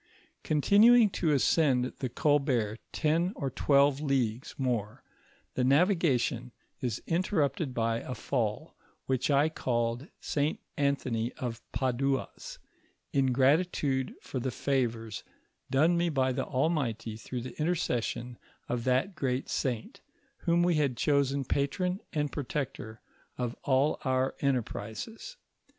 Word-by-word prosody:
Oontinuing 210 Hz, -, +5 dB
to 165 Hz, -4 st, 0 dB
ascend 135 Hz, -2 st, +3 dB
the 130 Hz, -, -2 dB
Colbert 125 Hz, -6 st, +1 dB
ten 170 Hz, +4 st, +1 dB
or 135 Hz, -2 st, -3 dB
twelve 140 Hz, +1 st, +3 dB
leagues 130 Hz, -5 st, -1 dB
more, 120 Hz, -6 st, -2 dB, 0.5 s
the 130 Hz, -, 0 dB
navigation 135 Hz, -, +2 dB, 0.3 s
is 125 Hz, -5 st, -3 dB
intermpted 165 Hz, -5 st, 0 dB
by 115 Hz, 0 st, +1 dB
a 130 Hz, -, -6 dB
fall, 125 Hz, +4 st, -2 dB, 0.3 s
which 130 Hz, +1 st, 0 dB
I 145 Hz, +1 st, +4 dB
called 120 Hz, -3 st, -1 dB
St. 145 Hz, +1 st, -1 dB, 0.2 s
Anthony 130 Hz, -5 st, 0 dB
of 120 Hz, -2 st, -5 dB
Padua's, 135 Hz, +1 st, -2 dB, 0.6 s
in 135 Hz, -2 st, +3 dB
gratitude 135 Hz, 0 st, +2 dB
for 130 Hz, -, -4 dB
the 130 Hz, -, -2 dB
favors 115 Hz, -6 st, -1 dB, 0.5 s
done 160 Hz, +6 st, +3 dB
me 170 Hz, 0 st, +2 dB
by 130 Hz, -4 st, +1 dB
the 125 Hz, -, -2 dB
Almighty 130 Hz, -6 st, -1 dB
through 120 Hz, +3 st, -5 dB
the 130 Hz, -, -8 dB
intercession 125 Hz, -7 st, -1 dB, 0.3 s
of 120 Hz, -1 st, -2 dB
that 130 Hz, +10 st, +2 dB
great 135 Hz, -4 st, -2 dB
saint, 120 Hz, -4 st, -3 dB, 0.5 s
whom 170 Hz, 0 st, +4 dB
we 175 Hz, 0 st, +3 dB
had 140 Hz, -5 st, +1 dB
chosen 140 Hz, -1 st, +1 dB
patron 180 Hz, +9 st, 0 dB
and 150 Hz, -2 st, -1 dB
protector 125 Hz, -5 st, -4 dB, 0.4 s
of 125 Hz, -1 st, -2 dB
all 140 Hz, +3 st, +2 dB
our 130 Hz, -1 st, +1 dB
enterprises. 140 Hz, -, -3 dB
135 Hz, 120 wpm, -30 LUFS, 125-150 Hz, 0.6 s, Oontinuing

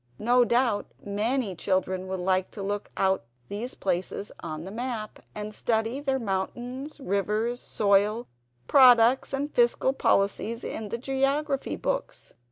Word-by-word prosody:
No 245 Hz, +2 st, +4 dB
doubt 235 Hz, -3 st, +1 dB, 0.2 s
many 215 Hz, +2 st, 0 dB
children 185 Hz, +1 st, -1 dB
will 190 Hz, 0 st, -3 dB
like 185 Hz, +1 st, +1 dB
to 200 Hz, -, -6 dB
look 205 Hz, +1 st, -3 dB
out 190 Hz, -5 st, +2 dB, 0.3 s
these 225 Hz, +5 st, -4 dB
places 190 Hz, +2 st, -2 dB
on 155 Hz, -1 st, -6 dB
the 190 Hz, -, -7 dB
map, 230 Hz, -1 st, -4 dB, 0.2 s
and 210 Hz, 0 st, -5 dB
study 225 Hz, +4 st, 0 dB
their 270 Hz, -2 st, 0 dB
mountains, 245 Hz, +7 st, -4 dB
rivers, 215 Hz, +2 st, -1 dB
soil, 210 Hz, +2 st, +2 dB, 0.4 s
products, 250 Hz, -, +6 dB
and 280 Hz, +2 st, -2 dB
fiscal 240 Hz, +2 st, +3 dB
policies, 225 Hz, 0 st, +1 dB
in 215 Hz, -2 st, -5 dB
the 235 Hz, -, -2 dB
geography 275 Hz, +2 st, 0 dB
books. -, -, -4 dB
225 Hz, 135 wpm, -27 LUFS, 200-255 Hz, 0.4 s, products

